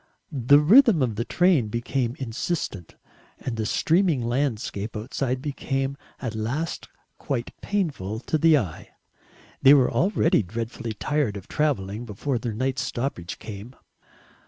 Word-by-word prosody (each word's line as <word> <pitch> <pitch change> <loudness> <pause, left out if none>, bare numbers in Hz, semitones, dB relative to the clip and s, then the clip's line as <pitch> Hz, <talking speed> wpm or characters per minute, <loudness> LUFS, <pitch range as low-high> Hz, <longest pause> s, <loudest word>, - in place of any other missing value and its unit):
The 140 0 +5
rhythm 195 - +6
of 120 -3 0
the 115 - -1
train 175 -10 +3
became 120 +2 -2
insistent, 115 - -4 0.4
and 125 - -4
the 110 -1 -2
streaming 165 -5 +2
landscape 115 -4 -2
outside 130 +4 -2
became 135 -2 -2 0.2
at 120 -5 -4
last 125 +10 -3 0.3
quite 125 -4 -3
painful 140 - -2
to 155 +5 -1
the 160 0 +6
eye. 95 - -4 0.7
They 140 +1 +8
were 130 -3 +4
already 195 - +2
dreadfully 115 +3 -5
tired 130 -2 -1
of 95 - -10
travelling 115 -7 -1
before 120 +5 -2
their 115 -1 -3
night's 130 +2 -1
stoppage 120 -8 -3
came. 110 +4 -9
125 Hz, 135 wpm, -25 LUFS, 110-145 Hz, 0.7 s, They